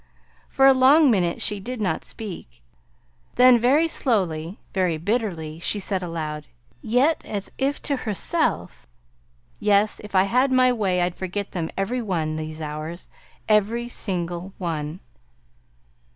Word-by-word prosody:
For 270 - +3
a 270 - +8
long 270 +3 +6
minute 175 -5 0
she 210 - 0
did 245 +5 -6
not 200 -3 -1
speak; 165 - -9 0.7
then 250 -1 +6
very 280 +8 +3
slowly, 185 - 0 0.2
very 180 -4 +1
bitterly, 170 -5 -2
she 205 +4 -1
said 190 -1 -1
aloud 155 -3 -5 0.3
yet 260 +8 +2
as 200 -2 -5
if 275 +2 0
to 280 - 0
herself: 215 -7 -2 0.7
"Yes. 210 0 +2
If 210 -1 -8
I 185 - +6
had 250 +7 +2
my 255 -1 +4
way 190 -6 0
I'd 175 0 -1
forget 190 +3 -5
them 165 -3 -3
every 240 +6 -1
one 165 -8 -2
these 155 0 -6
hours; 155 +3 -6 0.4
every 220 +3 +2
single 180 -4 -3
one!" 160 -1 -4
195 Hz, 135 wpm, -23 LUFS, 170-240 Hz, 0.7 s, a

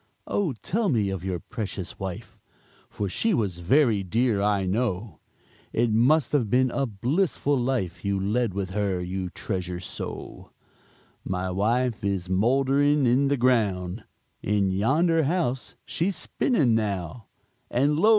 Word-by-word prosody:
"Oh, 185 -9 0
tell 215 +1 0
me 105 - +1
of 95 -2 -4
your 95 -2 -2
precious 100 -2 -6
wife, 95 -2 -6 0.5
For 100 - -3
she 215 - 0
was 95 - -1
very 110 - +3
dear, 110 +2 +1
I 100 -2 +1
know, 100 - -2 0.5
It 120 0 +2
must 130 +8 +3
have 125 -8 +1
been 130 +2 +3
a 140 -1 0
blissful 140 - 0
life 120 -9 -1
You 100 -1 0
led 110 +4 0
with 95 -2 -3
her 100 -2 0
you 90 +1 -3
treasure 90 -2 -4
so?" 90 - -7 0.7
"My 90 0 -2
wife 115 +4 0
is 95 -2 -1
mouldering 135 +7 +3
in 130 +4 +3
the 140 0 +1
ground, 105 -6 +1 0.4
In 100 -1 +1
yonder 155 - +2
house 140 -5 -1
she's 185 +3 -1
spinning 155 - +1
now, 105 0 -2 0.4
And 145 +5 +2
lo! 215 - +5
110 Hz, 140 wpm, -26 LUFS, 95-135 Hz, 0.7 s, lo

